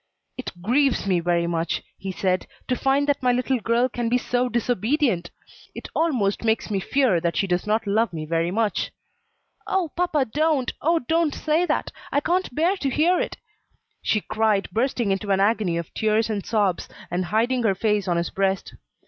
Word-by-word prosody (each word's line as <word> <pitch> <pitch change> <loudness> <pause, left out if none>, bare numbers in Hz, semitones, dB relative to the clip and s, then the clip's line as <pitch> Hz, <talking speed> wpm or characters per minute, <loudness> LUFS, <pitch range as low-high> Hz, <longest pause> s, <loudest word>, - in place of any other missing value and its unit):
"It 255 - -5
grieves 260 +4 +2
me 185 -3 +2
very 170 0 +1
much," 170 0 -1
he 195 0 -5
said, 185 0 -1 0.2
"to 255 - +1
find 270 +2 +2
that 285 -1 0
my 250 -1 +3
little 250 +1 0
girl 235 +3 +2
can 240 -2 -2
be 245 - +3
so 250 0 0
disobedient! 240 - 0 0.5
it - - -7
almost 250 -13 +1
makes 220 -1 0
me 200 - +1
fear 240 -3 +2
that 170 0 -1
she - - +2
does 180 +1 -1
not 220 +2 +1
love 210 +1 +1
me 155 -2 -5
very 165 +2 0
much." 215 +2 0 0.8
"Oh, 365 -5 0
papa, 335 -6 +1
don't! 295 +1 0
oh, 335 +2 +3
don't 325 +2 +1
say 320 +4 +1
that! - - -1 0.2
I 285 - +3
can't 350 -2 -1
bear 345 +6 +2
to 275 - -1
hear 330 +7 +3
it!" - - -3 0.6
she 215 - +1
cried, 215 -2 0
bursting 235 -2 0
into 195 +1 -2
an 195 -1 +3
agony 200 -4 +2
of 170 -2 -5
tears 220 +1 +1
and 205 -2 -2
sobs, 205 -5 0 0.2
and 180 +1 -1
hiding 235 +6 +1
her 210 -4 +2
face 210 0 0
on 175 -1 +1
his 170 - -1
breast. 195 0 -1
225 Hz, 190 wpm, -24 LUFS, 195-270 Hz, 0.8 s, my